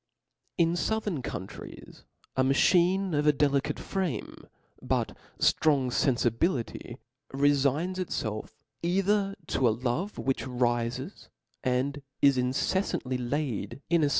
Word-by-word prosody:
In 170 Hz, -1 st, +3 dB
fouthern 200 Hz, -, -1 dB
countries 95 Hz, -, -8 dB, 0.3 s
a 130 Hz, -, +3 dB
machine 180 Hz, +7 st, +3 dB
of 150 Hz, 0 st, +1 dB
a -, -, +8 dB
delicate, 140 Hz, -1 st, +1 dB
frame, 180 Hz, -, -3 dB, 0.3 s
but -, -, -1 dB, 0.2 s
ftrong 140 Hz, -5 st, +3 dB
fenfibility, 120 Hz, -1 st, 0 dB, 0.3 s
refigns 145 Hz, +6 st, +2 dB
itfelf 110 Hz, -12 st, -3 dB, 0.3 s
either 195 Hz, +3 st, +1 dB
to 130 Hz, -4 st, +1 dB
a 110 Hz, -, +1 dB
love 130 Hz, -, -2 dB
which 135 Hz, 0 st, -1 dB
rifes 120 Hz, -1 st, -1 dB, 0.3 s
and 130 Hz, +3 st, 0 dB, 0.2 s
is 140 Hz, -1 st, +5 dB
inceflantiy 125 Hz, -1 st, 0 dB
laid 135 Hz, -4 st, -2 dB
in 170 Hz, -2 st, +4 dB
a 145 Hz, -, +3 dB
140 Hz, 110 wpm, -28 LUFS, 125-175 Hz, 0.3 s, a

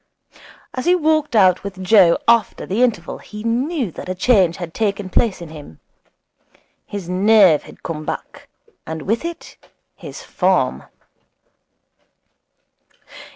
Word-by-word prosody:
As 255 Hz, -, -4 dB
he 355 Hz, +1 st, +4 dB
walked 310 Hz, -5 st, +1 dB
out 185 Hz, -4 st, +4 dB
with 195 Hz, -1 st, -7 dB
Joe 185 Hz, -4 st, +5 dB
after 235 Hz, -1 st, +2 dB
the 205 Hz, +6 st, -1 dB
interval 215 Hz, -9 st, 0 dB
he 210 Hz, 0 st, -10 dB
knew 250 Hz, -, -1 dB
that 180 Hz, -, -9 dB
a 185 Hz, -, -2 dB
change 190 Hz, -4 st, +3 dB
had 175 Hz, -3 st, -7 dB
taken 205 Hz, -3 st, -2 dB
place 200 Hz, -4 st, +1 dB
in 165 Hz, -, -10 dB
him. 145 Hz, -, -12 dB, 1.1 s
His 200 Hz, -4 st, -6 dB
nerve 190 Hz, -3 st, +4 dB
had -, -, -16 dB
come 155 Hz, -2 st, -5 dB
back, -, -, -7 dB, 0.4 s
and 160 Hz, -1 st, -5 dB
with 225 Hz, +7 st, -1 dB
it 340 Hz, 0 st, -7 dB, 0.4 s
his -, -, -10 dB
form. -, -, 0 dB
200 Hz, 130 wpm, -19 LUFS, 180-235 Hz, 1.1 s, Joe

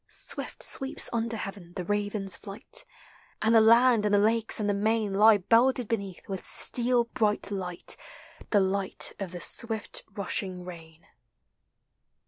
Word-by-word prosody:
Swift -, -, -3 dB
sweeps 270 Hz, 0 st, +2 dB
under 230 Hz, 0 st, -1 dB
'heaven 195 Hz, -4 st, -8 dB
the 180 Hz, -, -5 dB
raven's 205 Hz, -1 st, -2 dB
flight; 205 Hz, -, -2 dB, 0.5 s
And 220 Hz, +1 st, +1 dB
the 225 Hz, -, +6 dB
land 230 Hz, 0 st, +5 dB
and 205 Hz, -1 st, +2 dB
the -, -, +4 dB
lakes 220 Hz, +2 st, +1 dB
and 210 Hz, -, -1 dB
the 205 Hz, -, +1 dB
main 215 Hz, 0 st, 0 dB
Lie 215 Hz, +2 st, +6 dB
belted 235 Hz, +5 st, +2 dB
beneath 200 Hz, -5 st, -5 dB
with 190 Hz, -2 st, -5 dB
steel 245 Hz, 0 st, +2 dB
bright 215 Hz, -4 st, -1 dB
light, 180 Hz, -3 st, -2 dB, 0.5 s
The 205 Hz, -, +3 dB
light 190 Hz, 0 st, 0 dB
of 195 Hz, -3 st, -5 dB
the 180 Hz, -, -7 dB
swift 220 Hz, +3 st, -1 dB
rushing 190 Hz, -2 st, -2 dB
rain. 165 Hz, -2 st, -12 dB
205 Hz, 145 wpm, -27 LUFS, 195-225 Hz, 0.5 s, the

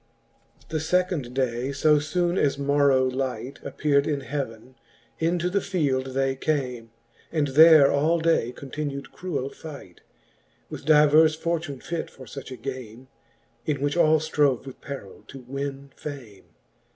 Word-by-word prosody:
VII. -, -, -23 dB
The 160 Hz, -, -1 dB
fecond 160 Hz, -5 st, 0 dB
day, 130 Hz, 0 st, -1 dB
fo 150 Hz, +2 st, +3 dB
foon 175 Hz, +4 st, 0 dB
as 140 Hz, -6 st, +1 dB
morrow 140 Hz, -2 st, +3 dB
light 130 Hz, 0 st, -3 dB
Appear'd 140 Hz, -2 st, +1 dB
in 145 Hz, -2 st, -1 dB
heaven, 130 Hz, -3 st, -5 dB, 0.5 s
into 170 Hz, +2 st, +1 dB
the 195 Hz, +2 st, 0 dB
field 140 Hz, -9 st, 0 dB
they 135 Hz, 0 st, +1 dB
came, 125 Hz, -5 st, -2 dB, 0.4 s
And 150 Hz, -3 st, 0 dB
there 155 Hz, 0 st, +7 dB
all 155 Hz, +4 st, +2 dB
day 160 Hz, -7 st, +2 dB
continew'd 140 Hz, 0 st, -6 dB
cruell 170 Hz, -7 st, -4 dB
fight. 140 Hz, -, -11 dB, 0.7 s
With -, -, -7 dB
divers 155 Hz, +1 st, +6 dB
fortune 160 Hz, -4 st, -3 dB
fit 170 Hz, -1 st, -4 dB
for 130 Hz, -, -13 dB
fuch 140 Hz, -1 st, -9 dB
a 130 Hz, -, -6 dB
game, 130 Hz, -2 st, -8 dB, 0.6 s
In 150 Hz, -3 st, 0 dB
which 145 Hz, +2 st, -1 dB
all 160 Hz, -2 st, +5 dB
ftrove 150 Hz, -4 st, +1 dB
with 135 Hz, -, -10 dB
perill 135 Hz, -9 st, -8 dB
to 135 Hz, -, -10 dB
winne 140 Hz, +2 st, -6 dB
fame. 125 Hz, -10 st, -9 dB
140 Hz, 145 wpm, -25 LUFS, 130-155 Hz, 0.7 s, there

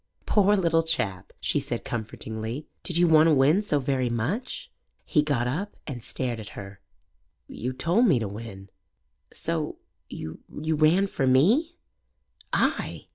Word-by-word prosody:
"Poor 205 Hz, 0 st, +4 dB
little 165 Hz, -4 st, +3 dB
chap," 105 Hz, -, -2 dB
she -, -, +1 dB
said -, -, -4 dB
comfortingly. 110 Hz, +3 st, -5 dB, 0.2 s
"Did 175 Hz, -, -2 dB
you 175 Hz, 0 st, +5 dB
want 160 Hz, 0 st, +6 dB
to 160 Hz, -, +5 dB
win 145 Hz, +8 st, +4 dB
so 205 Hz, -8 st, 0 dB
very 130 Hz, -2 st, 0 dB
much?" 130 Hz, -, -3 dB, 0.3 s
He 150 Hz, -, +3 dB
got 145 Hz, -5 st, 0 dB
up 180 Hz, +11 st, -3 dB
and 125 Hz, -6 st, -6 dB
stared 120 Hz, -3 st, -3 dB
at 105 Hz, -, -8 dB
her. 100 Hz, 0 st, -8 dB, 0.7 s
"Yo' 125 Hz, +3 st, -4 dB
told 175 Hz, -, +3 dB
me 160 Hz, -, +5 dB
to 110 Hz, -3 st, -2 dB
win." 100 Hz, -2 st, -9 dB, 0.6 s
"So -, -, -3 dB, 0.3 s
you 80 Hz, 0 st, -7 dB
ran 155 Hz, +4 st, +2 dB
for 135 Hz, -8 st, -1 dB
me?" 225 Hz, -, +4 dB, 0.8 s
"Ay!" -, -, -1 dB
145 Hz, 145 wpm, -26 LUFS, 115-170 Hz, 0.8 s, want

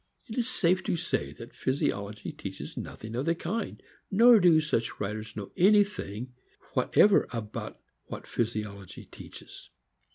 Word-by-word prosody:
It 225 Hz, -5 st, -8 dB
is 245 Hz, 0 st, 0 dB
safe 185 Hz, -5 st, +2 dB
to -, -, 0 dB
say 75 Hz, -, -2 dB
physi 130 Hz, -, -1 dB
ology 100 Hz, +1 st, -6 dB
teaches -, -, -7 dB
nothing 110 Hz, +1 st, -7 dB
of 130 Hz, +5 st, -2 dB
the 165 Hz, -, +3 dB
kind; 205 Hz, +7 st, -3 dB, 0.3 s
nor 230 Hz, +3 st, +7 dB
do 175 Hz, -4 st, +6 dB
such 150 Hz, -7 st, -1 dB
writers 105 Hz, +2 st, -4 dB
know 100 Hz, -2 st, -6 dB
anything 185 Hz, -, +2 dB, 0.4 s
whatever 205 Hz, -1 st, +4 dB
about 110 Hz, -3 st, -5 dB, 0.3 s
what -, -, -7 dB
physiology 105 Hz, -4 st, -4 dB
teaches. -, -, -12 dB
130 Hz, 135 wpm, -29 LUFS, -, 0.4 s, nor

